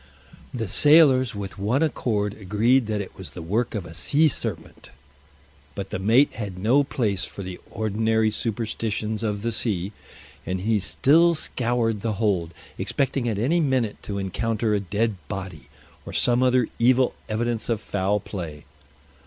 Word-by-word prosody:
The 115 Hz, -4 st, -3 dB
sailors 135 Hz, -, +5 dB
with 100 Hz, -1 st, -6 dB
one 120 Hz, +10 st, +1 dB
accord 105 Hz, -9 st, -1 dB
agreed 110 Hz, +5 st, +2 dB
that 105 Hz, -1 st, -1 dB
it 95 Hz, -, -8 dB
was 95 Hz, -, -8 dB
the 90 Hz, -, -9 dB
work 110 Hz, +8 st, -1 dB
of 100 Hz, -5 st, -3 dB
a 80 Hz, -, -10 dB
sea 150 Hz, -, +3 dB
serpent. 110 Hz, -, -5 dB, 0.9 s
But 100 Hz, -1 st, -6 dB
the -, -, -3 dB
mate 115 Hz, +9 st, +4 dB
had 100 Hz, -5 st, -6 dB
no 120 Hz, +9 st, +3 dB
place 105 Hz, -8 st, -1 dB
for 100 Hz, -, -8 dB
the 90 Hz, -1 st, -7 dB
ordinary 110 Hz, +1 st, +1 dB
superstitions 110 Hz, -1 st, -2 dB
of 105 Hz, -2 st, -2 dB
the 115 Hz, -, 0 dB
sea, 105 Hz, -4 st, -1 dB, 0.5 s
and 95 Hz, 0 st, -3 dB
he 110 Hz, +2 st, +1 dB
still 165 Hz, -, +4 dB
scoured 120 Hz, -6 st, 0 dB
the 115 Hz, 0 st, -1 dB
hold, 95 Hz, -6 st, 0 dB, 0.3 s
expecting 135 Hz, -3 st, 0 dB
at 110 Hz, -, -2 dB
any 140 Hz, +11 st, +2 dB
minute 130 Hz, -8 st, 0 dB
to 100 Hz, -, -5 dB
encounter 110 Hz, +3 st, -1 dB
a 105 Hz, -, +2 dB
dead 100 Hz, +2 st, -1 dB
body 90 Hz, -8 st, -7 dB, 0.3 s
or -, -, -9 dB
some 120 Hz, 0 st, +2 dB
other 125 Hz, -2 st, +3 dB
evil 125 Hz, +2 st, +4 dB, 0.2 s
evidence 115 Hz, +1 st, -1 dB
of 115 Hz, -3 st, +1 dB
foul 100 Hz, 0 st, -1 dB
play. 85 Hz, -7 st, -7 dB
110 Hz, 160 wpm, -24 LUFS, 100-120 Hz, 0.9 s, sailors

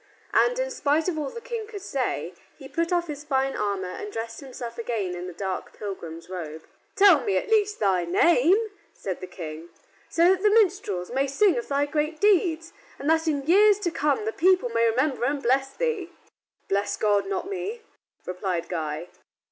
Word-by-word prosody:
And, -, -, +3 dB
in -, -, -1 dB
spite 315 Hz, -8 st, +1 dB
of 330 Hz, -4 st, -1 dB
all 290 Hz, -2 st, -2 dB
the 465 Hz, -, -8 dB
King 465 Hz, -3 st, -5 dB
could 410 Hz, -3 st, -8 dB
say, -, -, -2 dB, 0.2 s
he -, -, -10 dB
put 335 Hz, +1 st, -1 dB
off 350 Hz, -1 st, +2 dB
his 295 Hz, -3 st, -7 dB
fine 270 Hz, -2 st, 0 dB
armor 200 Hz, -3 st, -1 dB
and 210 Hz, -, -6 dB
dressed 225 Hz, +1 st, -5 dB
himself 245 Hz, -4 st, -8 dB
again 225 Hz, -6 st, -2 dB
in 180 Hz, +1 st, -5 dB
his 180 Hz, -, -8 dB
dark 190 Hz, 0 st, -4 dB
pilgrim's 170 Hz, -5 st, -7 dB
robe. 160 Hz, -4 st, -6 dB, 0.3 s
"Tell 390 Hz, -8 st, +7 dB
me 190 Hz, -, +1 dB
at 310 Hz, -, -3 dB
least 420 Hz, -1 st, +2 dB
thy 190 Hz, -4 st, +2 dB
name," 345 Hz, -, +3 dB, 0.2 s
said 190 Hz, -3 st, -5 dB
the 185 Hz, -, -6 dB
King, 165 Hz, -2 st, -8 dB, 0.4 s
"so 335 Hz, +2 st, +4 dB
that 380 Hz, -1 st, +1 dB
the 420 Hz, -, +5 dB
minstrels 365 Hz, -, +2 dB
may 270 Hz, +2 st, +1 dB
sing 360 Hz, +5 st, +3 dB
of 240 Hz, -, -3 dB
thy 285 Hz, 0 st, +1 dB
great 305 Hz, +2 st, -2 dB
deeds, 350 Hz, -5 st, +2 dB, 0.2 s
and 280 Hz, -, -6 dB
that 320 Hz, 0 st, +2 dB
in 285 Hz, -3 st, 0 dB
years 405 Hz, +5 st, +6 dB
to 350 Hz, -4 st, 0 dB
come 300 Hz, +5 st, 0 dB
the 440 Hz, -, -2 dB
people 365 Hz, -6 st, +3 dB
may 230 Hz, 0 st, +2 dB
remember 260 Hz, +3 st, 0 dB
and 280 Hz, +1 st, -1 dB
bless 270 Hz, +2 st, +2 dB
thee." 445 Hz, -, -2 dB, 0.6 s
"Bless 200 Hz, +1 st, 0 dB
God, 205 Hz, -2 st, +2 dB
not 195 Hz, -, -2 dB
me," 395 Hz, +4 st, -4 dB, 0.4 s
replied 180 Hz, -2 st, -3 dB
Guy. 160 Hz, 0 st, -3 dB
280 Hz, 190 wpm, -25 LUFS, -, 0.6 s, Tell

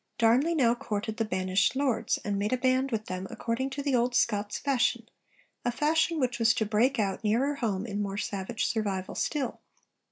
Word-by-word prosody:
Darnley 250 Hz, +9 st, +3 dB
now 240 Hz, -6 st, +4 dB
courted 220 Hz, -2 st, -4 dB
the 225 Hz, -, 0 dB
banished 185 Hz, +2 st, +1 dB
lords, 270 Hz, -4 st, +1 dB
and 200 Hz, -1 st, -1 dB
made 205 Hz, +1 st, -1 dB
a 255 Hz, -, +2 dB
'Band' 260 Hz, +1 st, +2 dB
with 215 Hz, -2 st, -2 dB
them 185 Hz, +1 st, -5 dB
according 240 Hz, +3 st, -2 dB
to 280 Hz, +1 st, -5 dB
the 280 Hz, -1 st, 0 dB
old 245 Hz, 0 st, +2 dB
Scots 210 Hz, -3 st, +1 dB
fashion, 265 Hz, -4 st, 0 dB, 0.6 s
a 245 Hz, -, +1 dB
fashion 320 Hz, +5 st, +1 dB
which 250 Hz, -3 st, 0 dB
was 225 Hz, -1 st, +4 dB
to 220 Hz, -, 0 dB
break 225 Hz, +6 st, +2 dB
out 200 Hz, -1 st, -1 dB
nearer 240 Hz, +7 st, +2 dB
home 205 Hz, -5 st, -1 dB
in 205 Hz, -2 st, -3 dB
more 200 Hz, -1 st, -3 dB
savage 205 Hz, +2 st, -2 dB
survival 195 Hz, -4 st, -2 dB
still. 275 Hz, -6 st, -2 dB
230 Hz, 190 wpm, -28 LUFS, 205-260 Hz, 0.6 s, now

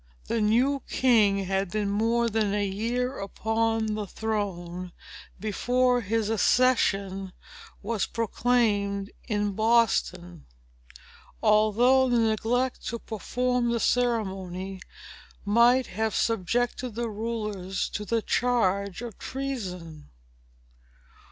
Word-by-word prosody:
The 230 Hz, -, -1 dB
new 250 Hz, +6 st, +2 dB
king 210 Hz, -6 st, +3 dB
had 195 Hz, 0 st, -1 dB
been 205 Hz, 0 st, -1 dB
more 230 Hz, +3 st, +1 dB
than 215 Hz, -2 st, 0 dB
a 205 Hz, -1 st, 0 dB
year 240 Hz, +6 st, -2 dB
upon 220 Hz, +2 st, -1 dB
the 210 Hz, -1 st, -4 dB
throne 185 Hz, -5 st, -4 dB, 0.5 s
before 245 Hz, +4 st, +1 dB
his 220 Hz, 0 st, -1 dB
accession 200 Hz, -4 st, +1 dB, 0.5 s
was 220 Hz, 0 st, -1 dB
proclaimed 210 Hz, -3 st, 0 dB, 0.2 s
in 205 Hz, -3 st, 0 dB
Boston; 195 Hz, -6 st, +1 dB, 1.0 s
although 240 Hz, +5 st, +4 dB
the 240 Hz, -, +2 dB
neglect 230 Hz, +3 st, 0 dB
to 235 Hz, -, -2 dB
perform 245 Hz, +2 st, -1 dB
the 235 Hz, 0 st, 0 dB
ceremony 195 Hz, -6 st, -1 dB, 0.6 s
might 235 Hz, +5 st, +4 dB
have 220 Hz, +3 st, -2 dB
subjected 235 Hz, +3 st, -1 dB
the 235 Hz, 0 st, -2 dB
rulers 210 Hz, -4 st, -3 dB
to 210 Hz, -, -4 dB
the 225 Hz, +1 st, -1 dB
charge 200 Hz, -5 st, 0 dB
of 235 Hz, -5 st, -8 dB
treason. 185 Hz, -, -6 dB
220 Hz, 100 wpm, -27 LUFS, 200-235 Hz, 1.0 s, although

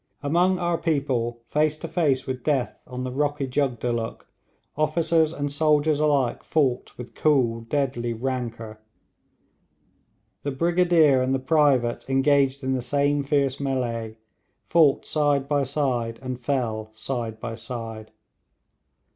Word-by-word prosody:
Among 175 Hz, +6 st, +2 dB
our 175 Hz, -1 st, 0 dB
people, 125 Hz, -7 st, -1 dB
face 150 Hz, +3 st, +1 dB
to 165 Hz, -, -6 dB
face 155 Hz, -5 st, +1 dB
with 130 Hz, -2 st, -4 dB
death 140 Hz, -5 st, -1 dB
on 125 Hz, 0 st, -5 dB
the 130 Hz, -, -3 dB
rocky 145 Hz, +1 st, -1 dB
Jugdulluk, 120 Hz, -4 st, -2 dB, 0.5 s
officers 155 Hz, +1 st, +2 dB
and 145 Hz, -3 st, -3 dB
soldiers 150 Hz, 0 st, +2 dB
alike 140 Hz, -5 st, +1 dB
fought 135 Hz, -5 st, 0 dB
with 125 Hz, -1 st, -9 dB
cool 130 Hz, -7 st, +2 dB
deadly 120 Hz, -1 st, -1 dB
rancour. 115 Hz, -3 st, -4 dB, 1.6 s
The 145 Hz, -, -3 dB
brigadier 170 Hz, -3 st, +3 dB
and 130 Hz, +1 st, +1 dB
the -, -, -1 dB
private 135 Hz, -4 st, +2 dB
engaged 135 Hz, 0 st, +2 dB
in 130 Hz, 0 st, 0 dB
the 130 Hz, -, -1 dB
same 145 Hz, +3 st, +1 dB
fierce 140 Hz, -2 st, +1 dB
mêlée, 120 Hz, -5 st, -2 dB, 0.5 s
fought 155 Hz, -5 st, +3 dB
side 145 Hz, -3 st, +1 dB
by 145 Hz, -1 st, +1 dB
side, 125 Hz, -5 st, -1 dB
and 130 Hz, -1 st, -4 dB
fell 120 Hz, -5 st, -2 dB
side 115 Hz, -2 st, -4 dB
by 115 Hz, 0 st, -5 dB
side. 115 Hz, -1 st, -7 dB
135 Hz, 130 wpm, -24 LUFS, 120-150 Hz, 1.6 s, brigadier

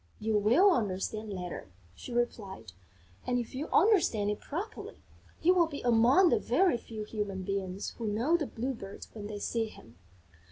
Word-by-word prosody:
"You 220 Hz, 0 st, 0 dB
will 240 Hz, -, +5 dB
understand 215 Hz, -, -1 dB
later," 180 Hz, -, -6 dB, 0.2 s
she 170 Hz, -, -10 dB
replied, 220 Hz, -, -3 dB, 0.6 s
"and, 250 Hz, -, +1 dB
if 240 Hz, +1 st, -4 dB
you 275 Hz, +4 st, -3 dB
understand 325 Hz, -, +3 dB
it 210 Hz, -, -4 dB
properly, 395 Hz, +9 st, -6 dB, 0.5 s
you 360 Hz, +3 st, +6 dB
will 345 Hz, -2 st, +4 dB
be 290 Hz, -3 st, -6 dB
among 245 Hz, +10 st, +5 dB
the -, -, +3 dB
very 370 Hz, -10 st, +2 dB
few 220 Hz, -2 st, -7 dB
human 205 Hz, -3 st, -4 dB
beings 195 Hz, 0 st, -3 dB
who 230 Hz, -, -2 dB
know 230 Hz, +11 st, +2 dB
the 310 Hz, -5 st, 0 dB
Blue 255 Hz, +4 st, -3 dB
Bird 195 Hz, -4 st, -9 dB
when 210 Hz, -2 st, -7 dB
they 210 Hz, -1 st, -5 dB
see 225 Hz, +2 st, -1 dB
him." 115 Hz, -, -15 dB
225 Hz, 170 wpm, -30 LUFS, 205-275 Hz, 0.6 s, you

